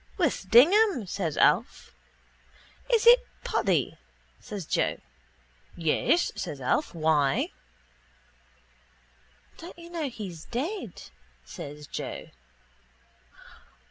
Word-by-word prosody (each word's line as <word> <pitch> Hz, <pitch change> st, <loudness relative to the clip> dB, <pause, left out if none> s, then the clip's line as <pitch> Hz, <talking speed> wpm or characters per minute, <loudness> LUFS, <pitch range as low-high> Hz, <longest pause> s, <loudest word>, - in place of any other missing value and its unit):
—With 290 Hz, -, -1 dB
Dignam, 330 Hz, -, +5 dB
says 175 Hz, -5 st, -3 dB
Alf. -, -, +2 dB, 1.0 s
—Is 465 Hz, -2 st, +3 dB
it 480 Hz, +1 st, +9 dB, 0.2 s
Paddy? -, -, 0 dB, 0.4 s
says 205 Hz, -7 st, -7 dB
Joe. -, -, 0 dB, 0.8 s
—Yes, 170 Hz, -, +1 dB
says 150 Hz, -6 st, -5 dB
Alf. 155 Hz, -, -1 dB
Why? 155 Hz, -4 st, +1 dB, 2.1 s
—Don't 340 Hz, 0 st, -10 dB
you 340 Hz, 0 st, -12 dB
know 320 Hz, -5 st, -3 dB
he's 190 Hz, -9 st, -8 dB
dead? 265 Hz, -, -4 dB, 0.4 s
says 145 Hz, -, -9 dB
Joe. -, -, -6 dB
220 Hz, 85 wpm, -27 LUFS, -, 2.1 s, it